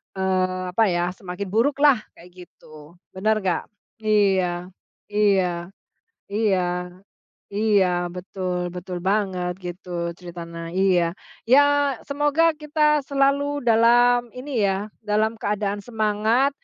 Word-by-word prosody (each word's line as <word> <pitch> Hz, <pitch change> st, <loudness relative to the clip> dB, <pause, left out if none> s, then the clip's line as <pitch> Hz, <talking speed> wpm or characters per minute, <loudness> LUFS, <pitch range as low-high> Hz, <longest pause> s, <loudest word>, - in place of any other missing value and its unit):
eee, 185 Hz, -1 st, 0 dB
apa 220 Hz, +3 st, +3 dB
ya, 175 Hz, 0 st, 0 dB
semakin 185 Hz, +1 st, -7 dB
buruklah, 275 Hz, +3 st, +3 dB, 0.2 s
kayak 180 Hz, +1 st, -14 dB
gitu. 155 Hz, +2 st, -16 dB, 0.2 s
Bener 215 Hz, +2 st, 0 dB
nggak? 180 Hz, -2 st, -1 dB, 0.3 s
Iya, 190 Hz, -4 st, +1 dB, 0.4 s
iya, 190 Hz, -5 st, +1 dB, 0.7 s
iya, 205 Hz, -3 st, +2 dB, 0.9 s
iya, 205 Hz, -3 st, +3 dB, 0.3 s
betul, 180 Hz, -1 st, -4 dB
betul 180 Hz, 0 st, -5 dB
banget. 190 Hz, -2 st, 0 dB
Gitu, 175 Hz, -1 st, -5 dB
ceritanya. 170 Hz, -1 st, -8 dB
Iya. 180 Hz, -3 st, +2 dB, 0.4 s
Ya, 275 Hz, +3 st, +7 dB, 0.5 s
semoga 295 Hz, +3 st, +2 dB
kita 300 Hz, 0 st, +1 dB
selalu 280 Hz, 0 st, +1 dB
dalam 240 Hz, +1 st, +4 dB
ini 250 Hz, -4 st, -2 dB
ya, 195 Hz, +2 st, -1 dB, 0.2 s
dalam 215 Hz, +2 st, +1 dB
keadaan 205 Hz, 0 st, -1 dB
semangat, 220 Hz, +3 st, +1 dB
200 Hz, 105 wpm, -23 LUFS, 180-235 Hz, 0.9 s, Ya